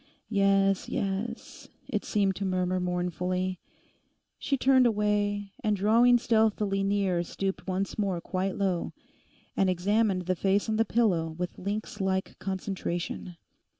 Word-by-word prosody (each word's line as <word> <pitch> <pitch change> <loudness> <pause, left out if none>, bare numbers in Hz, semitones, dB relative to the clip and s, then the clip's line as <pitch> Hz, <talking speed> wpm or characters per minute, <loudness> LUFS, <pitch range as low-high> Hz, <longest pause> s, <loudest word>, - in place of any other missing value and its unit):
'Yes, 195 -2 +2
yes,' 205 +4 -4 0.2
it - - -2
seemed 200 -3 +1
to 200 - -3
murmur 185 -1 0
mournfully. 180 +1 -2 0.8
She 275 - 0
turned 260 -1 +5
away, 205 -2 0
and 210 -1 +2
drawing 230 +5 +5
stealthily 215 -4 +1
near 195 -3 +1
stooped 190 +3 -4
once 190 +2 -2
more 195 -4 0
quite 185 +2 -2
low, 190 -4 -1 0.6
and 195 - +2
examined 195 +1 +1
the 185 +1 0
face 195 +4 +1
on 220 -1 0
the 225 - +3
pillow 175 -10 +1
with 180 0 -4
lynx 205 +1 -4
like 190 0 -1
concentration. 185 -2 -4
195 Hz, 130 wpm, -28 LUFS, 185-210 Hz, 0.8 s, turned